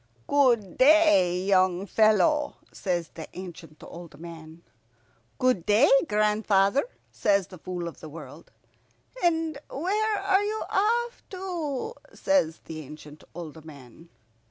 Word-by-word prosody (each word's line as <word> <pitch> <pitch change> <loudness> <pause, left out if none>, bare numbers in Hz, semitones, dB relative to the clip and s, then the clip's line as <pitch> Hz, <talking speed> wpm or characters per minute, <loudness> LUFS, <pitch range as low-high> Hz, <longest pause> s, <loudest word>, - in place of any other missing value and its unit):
"Good 240 -9 +2
day, 255 - +5
young 185 -1 +2
fellow," 220 - +2 0.2
says 175 -4 -3
the 160 - -9
ancient 170 -4 -10
old 170 -2 -11
man. 165 0 -11 0.7
"Good 255 -9 +1
day, 215 - +4 0.2
grandfather," 210 +2 +2 0.3
says 200 -3 +1
the 185 -1 -13
Fool 175 0 -5
of 170 - -9
the 155 - -10
World. 165 - -11 0.7
"And 325 -3 +1
where 415 +8 -1
are 390 0 +2
you 430 +1 -2
off 470 +4 0
to?" 360 - -4 0.2
says 165 - +1
the 160 -1 -7
ancient 150 +1 -12
old 160 -2 -9
man. 145 +1 -14
200 Hz, 120 wpm, -26 LUFS, -, 0.7 s, day